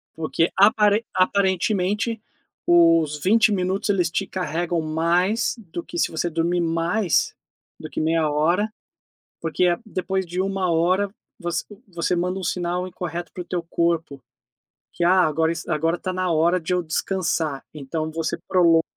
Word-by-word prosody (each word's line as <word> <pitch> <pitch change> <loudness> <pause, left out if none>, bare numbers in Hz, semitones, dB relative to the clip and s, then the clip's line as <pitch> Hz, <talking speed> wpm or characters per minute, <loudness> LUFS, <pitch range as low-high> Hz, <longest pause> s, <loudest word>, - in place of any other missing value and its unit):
porque 165 +1 0
aparen 210 +1 +5
aparentemente 200 +3 +1 0.5
os 165 -3 +4
20 220 +2 +4
minutos, 190 +1 0
eles 180 -5 +1
te 195 +3 -1
carregam 175 -1 -2
mais 170 +9 +1 0.2
do 170 - -3
que 170 - -7
se - - +2
você 170 +2 -2
dormir 170 +2 0
mais 170 +3 +1 0.4
do - - -8
que - - -4
meia 160 -1 +1
hora, 175 +9 +1 0.7
porque 165 +2 +1
a 175 -1 +2
depois 190 -2 -2
de 175 +2 -3
1 190 -2 0
hora, 185 +5 +2 0.3
voc 175 0 -4 0.4
você 175 0 -1
manda 180 +2 -1
um 190 - -5
sinal 180 +1 -2
incorreto 175 -1 -6
para 180 - -5
o - - -15
teu 175 -1 -3
corpo, 165 -4 -1 0.7
que: 175 - -2
"Ah, 185 +2 +5
agora 160 +1 +1
es 170 - -6
agora 165 +1 0
tá 185 - -3
na 185 -1 -1
hora 170 +3 +3
de 170 +3 -2
eu 180 - +1
descansar", 160 -3 -1
então 155 +2 -4
você 165 0 -2
prolonga 170 -3 +4
175 Hz, 160 wpm, -23 LUFS, 165-185 Hz, 0.7 s, aparen